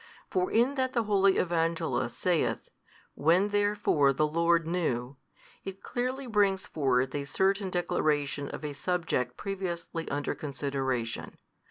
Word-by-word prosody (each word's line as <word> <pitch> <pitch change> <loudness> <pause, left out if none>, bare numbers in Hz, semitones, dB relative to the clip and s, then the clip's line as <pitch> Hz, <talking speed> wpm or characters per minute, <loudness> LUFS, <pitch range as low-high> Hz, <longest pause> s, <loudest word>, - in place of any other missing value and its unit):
For 185 -1 +1
in 240 +5 +3
that 260 0 -1
the 235 - +2
holy 195 -2 +3
Evangelist 165 -1 0
saith - - 0 0.4
When 175 +7 +3
therefore 205 -9 +2
the 155 +3 +2
Lord 170 +2 +2
knew, 140 -7 -1 0.5
it 195 0 -8
clearly 255 +2 -2
brings 205 -5 +2
forth 130 -3 +1
a 145 -1 -2
certain 195 +5 +1
declaration 145 -5 0
of - - -6
a 145 - -3
subject 145 -6 -1
previously 175 -4 -4
under 145 0 -1
consideration. 135 -5 -3
170 Hz, 130 wpm, -29 LUFS, 145-195 Hz, 0.5 s, in